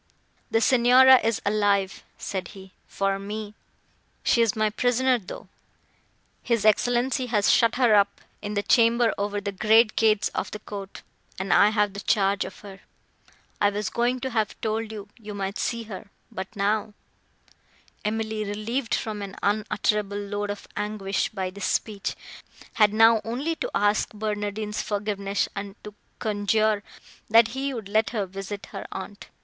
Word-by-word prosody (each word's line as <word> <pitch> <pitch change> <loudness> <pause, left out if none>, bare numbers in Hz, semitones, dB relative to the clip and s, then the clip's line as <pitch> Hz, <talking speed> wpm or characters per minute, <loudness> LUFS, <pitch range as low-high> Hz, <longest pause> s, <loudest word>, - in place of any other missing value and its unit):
"The 225 - +2
Signora 255 +2 +7
is 225 -1 -1
alive," 200 -2 +1 0.2
said 185 -3 -4
he, 190 0 -12 0.2
"for 195 0 -1
me. 210 +1 -6 0.7
She 235 - +3
is 225 -3 +2
my 215 -1 +1
prisoner, 250 +2 +2
though; 185 - -10 0.9
his 230 -3 0
Excellenza 245 +4 +2
has 210 -4 +3
shut 230 0 +4
her 245 -3 +4
up 200 -1 +3 0.2
in 210 0 -4
the 205 - 0
chamber 230 0 +4
over 205 0 -1
the 200 0 -4
great 215 +3 +4
gates 215 -2 +3
of - - -3
the - - -6
court, 200 -2 -9 0.3
and 190 +1 0
I 205 - +6
have 210 -2 +1
the 200 - -6
charge 200 -1 +1
of 190 - -10
her. 195 -2 -11 0.8
I 205 - +5
was 205 0 -3
going 245 +2 0
to 260 - -3
have 220 -3 -1
told 220 0 -2
you, 210 -2 -8
you 210 -2 -8
might 195 0 -3
see 235 -1 -2
her—but 200 -1 -9
now—" 210 +1 0 1.1
Emily, 220 0 -2
relieved 220 +5 -2
from 215 -2 -4
an 195 -1 -7
unutterable 210 0 0
load 205 0 -3
of 205 0 -6
anguish 205 -2 -2
by 190 -4 -4
this 200 0 -5
speech, 205 -3 -2 0.6
had 210 -2 +4
now 225 +1 +5
only 265 +9 -2
to - - -3
ask 205 +1 +2
Barnardine's 210 0 -3
forgiveness, 200 -1 -2
and 200 0 -6
to 210 - -9 0.2
conjure, 215 0 +1 0.5
that 225 +1 +6
he 270 +3 -3
would 225 -6 -6
let 215 +2 +2
her 215 -4 -2
visit 195 +2 -7
her - - -7
aunt. 200 +2 -8
210 Hz, 155 wpm, -25 LUFS, 200-225 Hz, 1.1 s, Signora